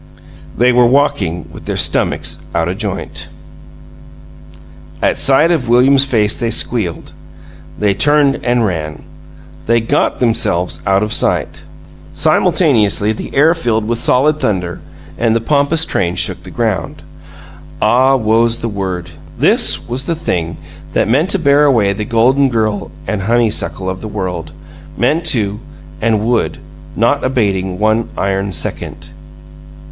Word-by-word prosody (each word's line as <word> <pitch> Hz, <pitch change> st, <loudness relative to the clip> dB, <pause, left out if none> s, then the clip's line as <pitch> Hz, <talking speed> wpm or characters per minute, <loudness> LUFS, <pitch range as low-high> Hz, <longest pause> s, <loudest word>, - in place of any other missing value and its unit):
They 125 Hz, +1 st, +3 dB
were 120 Hz, 0 st, +4 dB
walking 95 Hz, -, 0 dB
with -, -, -12 dB
their -, -, -3 dB
stummicks -, -, +1 dB, 0.2 s
out 85 Hz, 0 st, 0 dB
o' 90 Hz, -, -2 dB
joint. 100 Hz, -1 st, -6 dB, 1.7 s
At -, -, 0 dB
sight 150 Hz, +5 st, +3 dB
of 135 Hz, -9 st, -1 dB
William's 130 Hz, +3 st, +4 dB
face 110 Hz, -6 st, +1 dB
they 120 Hz, -2 st, -2 dB
squealed. 110 Hz, -6 st, -2 dB, 0.6 s
They 105 Hz, -1 st, +1 dB
turned 145 Hz, +3 st, +2 dB
and 120 Hz, -1 st, +1 dB
ran. 80 Hz, -5 st, -4 dB, 0.6 s
They 115 Hz, +1 st, +3 dB
got 115 Hz, -, -1 dB
themselves 90 Hz, -9 st, 0 dB
out 95 Hz, +1 st, +2 dB
of 105 Hz, -, -2 dB
sight. -, -, 0 dB, 0.5 s
Simultaneously, 105 Hz, 0 st, +2 dB
the 110 Hz, -, -6 dB
air 155 Hz, +4 st, +4 dB
filled 115 Hz, -10 st, -1 dB
with 120 Hz, 0 st, -2 dB
solid 150 Hz, +4 st, +2 dB
thunder 90 Hz, -5 st, -2 dB, 0.4 s
and 115 Hz, -1 st, +1 dB
the -, -, +2 dB
pompous 145 Hz, +6 st, +2 dB
train 90 Hz, -2 st, -1 dB
shook 85 Hz, -1 st, -2 dB
the -, -, -12 dB
ground. -, -, -3 dB, 0.8 s
Ah, 130 Hz, +5 st, +3 dB
woe's 115 Hz, -1 st, +2 dB
the 115 Hz, -, -4 dB
word! 95 Hz, -4 st, -5 dB, 0.3 s
This -, -, +2 dB
was 125 Hz, +3 st, -3 dB
the 165 Hz, -, -1 dB
thing 85 Hz, -, -3 dB, 0.4 s
that -, -, +1 dB
meant 145 Hz, -, +1 dB
to 200 Hz, -, +4 dB
bear 145 Hz, -3 st, +3 dB
away 110 Hz, -8 st, +2 dB
the 105 Hz, +1 st, -4 dB
golden 130 Hz, +5 st, +2 dB
girl 110 Hz, -4 st, -1 dB, 0.2 s
and 105 Hz, -3 st, -3 dB
honeysuckle 110 Hz, -3 st, 0 dB
of 95 Hz, 0 st, -4 dB
the 110 Hz, -, -6 dB
world 90 Hz, -6 st, -5 dB, 0.5 s
meant 155 Hz, +8 st, 0 dB
to, 105 Hz, -7 st, +1 dB, 0.4 s
and 110 Hz, -1 st, +1 dB
would, 120 Hz, -1 st, 0 dB, 0.4 s
not 120 Hz, +6 st, +1 dB
abating 95 Hz, -7 st, -1 dB
one 110 Hz, +2 st, 0 dB
iron 95 Hz, 0 st, -1 dB
second! -, -, -3 dB
115 Hz, 140 wpm, -15 LUFS, 100-130 Hz, 1.7 s, were